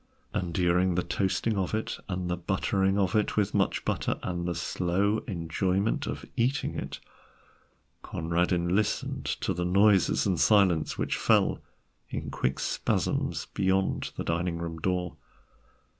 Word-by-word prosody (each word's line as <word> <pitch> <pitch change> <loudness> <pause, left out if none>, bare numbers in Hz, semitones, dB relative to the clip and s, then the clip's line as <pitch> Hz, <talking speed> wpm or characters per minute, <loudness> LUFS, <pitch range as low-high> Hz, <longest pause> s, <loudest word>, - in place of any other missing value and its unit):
And 90 -2 -2
during 90 +1 +2
the 90 - +1
toasting 100 +2 0
of 95 +2 -1
it 110 - -3
and 90 -1 -2
the 90 - 0
buttering 95 +2 0
of 95 -1 +1
it 105 0 +1
with 105 -1 +1
much 100 -2 +1
butter - - -1
and 85 -1 -2
the 85 - -1
slow 95 +7 0
enjoyment 95 +3 0
of - - -5
eating 130 +4 0
it, - - -5 1.0
Conradin 85 +2 0
listened 105 0 -1
to - - -1
the 90 - -2
noises 95 +1 +4
and 90 -5 +1
silences 95 -7 +3
which - - -1
fell - - +3 0.5
in - - -4
quick 65 +1 -1
spasms - - -1
beyond 95 0 +1
the - - -2
dining 85 +1 -1
room 85 -1 -5
door. 90 0 -1
90 Hz, 145 wpm, -28 LUFS, 85-100 Hz, 1.0 s, noises